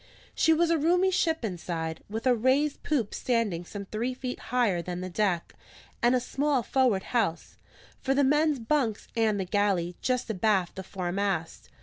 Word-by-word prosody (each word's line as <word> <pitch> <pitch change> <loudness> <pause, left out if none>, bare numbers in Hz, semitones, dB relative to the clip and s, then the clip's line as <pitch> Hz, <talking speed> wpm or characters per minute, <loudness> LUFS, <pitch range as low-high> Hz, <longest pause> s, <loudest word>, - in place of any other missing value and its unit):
She 320 - +3
was 330 +1 +3
a 330 - +3
roomy 355 +5 +3
ship 325 -7 +1
inside, 165 -4 -4
with 225 +3 -4
a 255 - +5
raised 260 +5 +1
poop 255 -9 -1
standing 225 -9 0
some 200 +3 -7
three 235 +6 -3
feet 250 -1 -5
higher 230 -8 +2
than 180 +1 -5
the 185 0 -5
deck, 180 -3 0 0.5
and 240 +2 +4
a - - +3
small 275 +1 0
forward 240 -6 +2
house, 210 -9 -1 0.4
for 270 0 0
the 285 - +3
men's 295 +2 +3
bunks 230 -2 -1
and 220 -3 +2
the 190 - -1
galley, 185 -3 0
just 250 -1 0
abaft 195 -3 +1
the 190 - -5
foremast. 185 -2 -3
225 Hz, 170 wpm, -28 LUFS, 190-265 Hz, 0.5 s, a